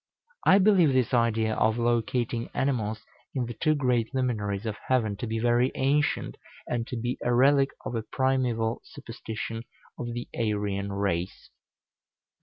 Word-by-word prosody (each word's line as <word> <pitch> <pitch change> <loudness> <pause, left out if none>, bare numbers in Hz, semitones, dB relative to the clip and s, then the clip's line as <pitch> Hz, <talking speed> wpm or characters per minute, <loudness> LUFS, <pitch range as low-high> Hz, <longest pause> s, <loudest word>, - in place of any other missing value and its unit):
I 190 - +8
believe 185 -7 +5
this 130 -1 +1
idea 115 -2 +2
of 110 +1 +2
locating 120 0 0
animals 110 -6 -1 0.3
in 130 -2 0
the 120 - -5
two 155 +8 +1
great 125 -3 0
luminaries 105 -5 -1
of 110 -2 -2
heaven 115 -6 +1
to 115 - -4
be 110 +1 -2
very 120 +2 +2
ancient, 145 +2 +1 0.3
and 120 -2 -2
to 125 - -4
be 120 +2 -2
a 120 - +1
relic 135 +3 +4 0.2
of - - -4
a 115 - -1
primeval 120 -2 0
superstition 115 -4 -6 0.4
of 120 - -3
the 120 - -4
Aryan 105 -3 -1
race. 100 -3 -2
120 Hz, 150 wpm, -27 LUFS, 110-130 Hz, 0.4 s, I